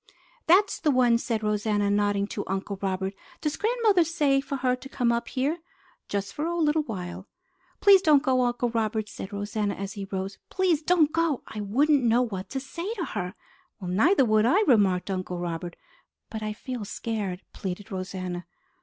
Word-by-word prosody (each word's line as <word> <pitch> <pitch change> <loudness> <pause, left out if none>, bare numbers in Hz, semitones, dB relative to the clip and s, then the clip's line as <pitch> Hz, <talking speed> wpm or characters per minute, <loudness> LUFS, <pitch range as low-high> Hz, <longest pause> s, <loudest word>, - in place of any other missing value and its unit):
"That's 400 +5 +4
the 315 - +1
one!" 245 -4 +4
said 225 -3 -2
Rosanna, 210 -1 +1
nodding 205 -1 +2
to 205 - -3
Uncle 195 +1 -3
Robert. 190 0 -1 0.3
"Does 300 -1 -1
grandmother 435 -5 +3
say 295 -5 +2
for 275 - -4
her 255 -1 +1
to 270 +2 -11
come 245 -4 +1
up 235 0 -1
here?" 285 +6 -1 0.5
"Just 200 -1 -2
for 300 +2 -2
a 345 0 -2
little 310 -1 +2
while." 185 -7 -6 0.5
"Please 395 -2 +7
don't 300 -5 +5
go, 260 -3 +2
Uncle 245 -1 0
Robert," 220 -1 -1
said 190 - -8
Rosanna 205 0 -2
as 195 0 -5
he 200 -2 -5
rose. 195 0 -5
"Please 365 -5 +1
don't 315 -2 +3
go! 330 -5 0
I 215 - -6
wouldn't 275 +8 +3
know 235 +1 +4
what 195 -6 -5
to 270 - -3
say 335 +9 -5
to 355 -6 -2
her." 180 -3 -3 0.4
"Neither 220 - +3
would 215 0 +3
I," 375 - +4
remarked 200 - +3
Uncle 185 -1 -3
Robert. 175 0 -4 0.6
"But 220 - -5
I 215 0 -3
feel 245 +1 -6
scared!" 205 -3 -4
pleaded 195 +2 -6
Rosanna. 185 -2 -5
225 Hz, 180 wpm, -26 LUFS, 195-295 Hz, 0.6 s, Please